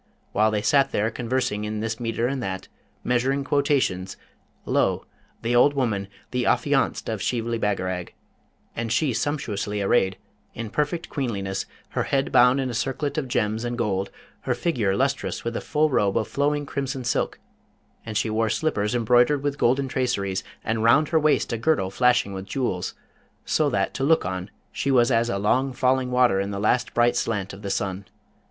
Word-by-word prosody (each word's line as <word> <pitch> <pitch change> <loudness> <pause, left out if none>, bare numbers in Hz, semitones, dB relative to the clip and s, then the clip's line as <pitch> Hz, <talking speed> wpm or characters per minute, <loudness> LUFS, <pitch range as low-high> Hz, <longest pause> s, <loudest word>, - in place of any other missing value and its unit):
While 110 +2 +3
they 105 -1 -1
sat 140 -2 +3
there 110 +2 0
conversing 120 -3 -1
in 105 0 -3
this 115 +1 -3
metre 115 0 -1
and 135 +1 -1
that, 95 -4 -4 0.4
measuring 130 +3 +1
quotations, 135 -10 0 0.5
lo! - - +1 0.4
the 120 +2 +1
old 145 +4 +5
woman, 110 -7 0 0.2
the 125 -1 0
affianced - - +1
of - - -3
Shibli 115 -1 -1
Bagarag 95 -4 -2 0.6
and 115 -1 -3
she 145 -2 +2
sumptuously 110 -7 -2
arrayed, 95 -1 +2 0.4
in 115 -2 -5
perfect 150 +3 -1
queenliness, 100 -8 -3 0.2
her - - -1
head 135 0 0
bound 125 +2 +5
in 130 -2 -1
a - - -6
circlet 135 +5 -1
of 135 - -4
gems 110 -1 0
and 120 0 -3
gold, 100 -4 -1 0.3
her - - -1
figure 115 - 0
lustrous 140 +4 -1
with 115 0 -3
a - - -2
full 155 0 +1
robe 100 -6 +2
of 110 - 0
flowing 145 +1 0
crimson 135 -2 -3
silk; 120 - -1 0.7
and 110 -2 -3
she - - +1
wore 110 +1 +1
slippers 105 -8 0
embroidered 120 +4 +3
with 145 0 -2
golden 135 +3 +2
traceries, 100 -8 -1 0.2
and 115 0 -1
round 145 +7 +4
her 160 -1 +3
waist 155 -5 +2
a 115 - -2
girdle 115 -9 +1
flashing 125 -2 +2
with 95 0 -6
jewels, 95 -6 -2 0.5
so 155 -2 +2
that 100 -6 0
to 135 - -3
look 160 +3 +3
on 90 +1 -4 0.2
she 140 - -2
was 125 -1 +4
as 115 0 +2
a 100 - -1
long 130 +7 +1
falling 130 0 +1
water 125 -5 +3
in 100 0 -1
the 100 -1 -4
last 120 +4 +1
bright 120 0 +3
slant 100 -6 -1
of 95 - -10
the 100 - -4
sun. 95 0 -2
120 Hz, 180 wpm, -24 LUFS, 105-135 Hz, 0.7 s, old